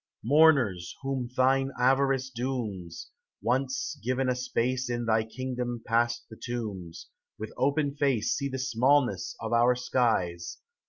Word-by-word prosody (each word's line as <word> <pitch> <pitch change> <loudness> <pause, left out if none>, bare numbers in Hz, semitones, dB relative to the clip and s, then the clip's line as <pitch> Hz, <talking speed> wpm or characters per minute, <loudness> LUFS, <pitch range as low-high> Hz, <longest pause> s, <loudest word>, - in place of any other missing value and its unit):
Mourners, 130 - +4
whom 135 -3 -2
thine 135 +1 +3
avarice 135 +1 +2
dooms. 115 -9 -4 0.3
Once 130 +5 -1
given 130 +2 0
a 125 - +1
space 125 0 -1
In 120 -1 -2
thy 110 -1 +2
kingdom 125 0 -4
past 120 +1 +1
the 110 - -13
tombs, 100 -8 -5 0.3
With 110 0 -7
open 140 +1 +1
face 135 -7 +1
See 140 -1 -2
the 130 - -4
smallness 130 0 +1
of 110 +1 -4
our 120 +1 +4
skies. 100 -9 0
125 Hz, 130 wpm, -28 LUFS, 115-135 Hz, 0.3 s, Mourners